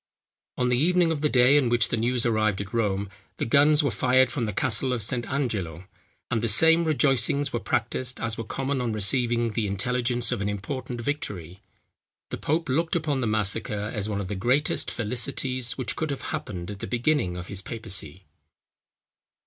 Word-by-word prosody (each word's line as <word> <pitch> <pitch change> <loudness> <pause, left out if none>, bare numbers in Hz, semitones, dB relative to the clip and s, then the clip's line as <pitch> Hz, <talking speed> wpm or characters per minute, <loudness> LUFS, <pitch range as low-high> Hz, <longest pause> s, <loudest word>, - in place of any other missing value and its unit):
On 125 -1 +1
the 125 0 +2
evening 175 +2 +3
of 155 -3 -2
the 150 - +2
day 130 +3 +5
on 130 -4 0
which 120 -1 +2
the - - 0
news 120 +2 0
arrived 110 -4 +1
at 100 +2 -6
Rome, 100 -3 0 0.3
the - - -2
guns 145 +5 +4
were 140 - +1
fired 130 +1 +3
from 125 -5 -2
the 105 - -2
castle 125 +5 +1
of 120 -4 -1
St. 120 +2 -1
Angelo; 100 - -3 0.5
and 115 - +1
the 115 - 0
same 160 +9 +5
rejoicings 140 -1 +2
were 120 - 0
practised 125 +3 -1
as 115 -1 -2
were 115 - -5
common 135 +4 -2
on 120 -3 -2
receiving 115 +2 +2
the 110 -1 -1
intelligence 120 +4 0
of 120 -5 -2
an 100 - -1
important 120 +4 -5
victory. 100 - -5 0.7
The - - -3
pope 160 +3 -1
looked 160 +6 0
upon 150 -5 -1
the 120 - 0
massacre, 105 0 -1
as 105 -2 -3
one 100 -1 -2
of 100 - -4
the 105 - -4
greatest 125 +10 +1
felicities 125 +2 -2
which 130 - -2
could 160 - -2
have 140 - -4
happened 90 -2 -5
at 100 - -8
the - - -5
beginning 120 - 0
of 90 - -6
his 95 +1 -5
papacy. 95 -6 -4
120 Hz, 190 wpm, -25 LUFS, 105-135 Hz, 0.7 s, day